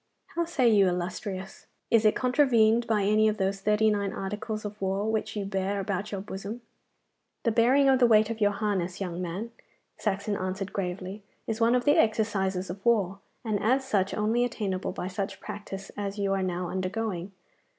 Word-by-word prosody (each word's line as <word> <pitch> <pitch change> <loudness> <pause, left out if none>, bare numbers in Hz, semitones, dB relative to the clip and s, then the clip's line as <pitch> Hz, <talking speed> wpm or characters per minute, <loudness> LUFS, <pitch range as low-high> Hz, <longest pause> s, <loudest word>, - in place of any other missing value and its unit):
How 340 0 -1
say 280 -7 +2
you, 205 -4 +5
illustrious, 185 +2 -4 0.2
is 225 -1 +4
it 215 - +5
contravened 240 -3 +3
by 215 -3 +2
any 215 +2 +4
of 215 0 0
those 195 0 -1
thirty 210 +1 +3
nine 200 -2 -1
articles 210 +2 -4
of 210 0 -7
war 195 +2 0
which 220 0 -2
you 205 -2 -2
bear 195 0 -1
about 200 +1 -3
in 200 - -2
your - - -4
bosom?' 205 +4 -6 0.8
'The 230 - +2
bearing 255 +5 +4
of 265 -1 +5
the 245 - +6
weight 215 -1 +4
of 225 -1 -6
your 205 - +5
harness, 200 -4 -2
young 180 -2 -3
man,' 185 +7 -4 0.5
Saxon 205 0 -1
answered 190 +1 -3
gravely, 190 +1 -4 0.2
'is 225 0 -3
one 230 +2 +4
of 245 - +1
the 290 - +5
exercises 200 -4 +1
of 195 +2 -9
war, 200 -5 +2 0.3
and 215 -3 0
as 260 +4 +2
such 195 -6 +1
only 220 +3 +1
attainable 200 -6 -2
by 180 - -4
such 195 0 -4
practice 195 -1 -7
as 200 0 -4
you 200 -1 0
are 195 - 0
now 180 -1 -2
undergoing. 190 0 -3
205 Hz, 190 wpm, -28 LUFS, 190-220 Hz, 0.8 s, the